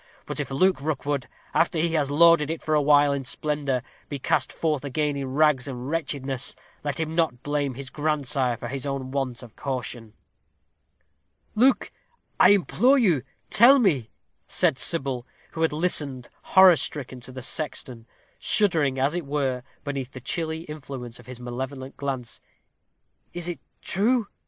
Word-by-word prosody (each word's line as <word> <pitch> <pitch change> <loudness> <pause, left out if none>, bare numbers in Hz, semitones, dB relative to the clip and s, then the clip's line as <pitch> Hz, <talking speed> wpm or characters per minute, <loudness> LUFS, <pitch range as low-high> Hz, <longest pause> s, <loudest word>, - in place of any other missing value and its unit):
But - - -4
if - - -3
Luke 160 +3 +2
Rookwood, 145 -3 -2 0.3
after 165 0 +2
he 165 +2 +2
has 145 -4 +1
lorded 160 0 +5
it 165 0 -4
for 155 - -1
awhile 145 -1 +5
in 140 -1 -3
splendor, 140 -2 -2 0.3
be 145 - -3
cast 130 0 0
forth 150 -4 -1
again 145 +1 -1
in 135 -1 -4
rags 150 -4 +3
and 130 +1 -5
wretchedness, 140 -5 -3 0.3
let 145 0 -2
him 160 -1 -2
not 160 -7 0
blame 145 -3 -1
his 135 +1 -7
grandsire 145 -5 0
for - - -6
his 135 +1 -4
own 135 -2 -3
want 130 -3 -3
of 120 -2 -13
caution." 120 -5 -4 1.4
"Luke, 255 +5 +3 0.5
I - - +8
implore 220 +7 +4
you, 180 - +3 0.3
tell 250 +6 +7
me," 155 - +2 0.4
said 160 -7 +2
Sybil, 135 -6 +2 0.2
who 160 - -5
had 160 - +3
listened, 150 -6 -1
horror 190 -3 +7
stricken, 130 -4 -3
to 125 +1 -8
the 130 -1 -8
sexton, 125 -5 -2 0.3
shuddering, 160 -10 +2
as 135 +3 +1
it 175 -4 -3
were, 135 -3 -1 0.2
beneath 135 -3 -4
the 130 - -7
chilly 160 +4 -3
influence 135 -6 -8
of - - -16
his 125 -1 -9
malevolent 130 +2 -6
glance, 130 -4 -5 0.9
"is 175 -1 -3
this 175 -2 -3 0.3
true? 230 +5 +1
140 Hz, 155 wpm, -25 LUFS, 130-160 Hz, 1.4 s, I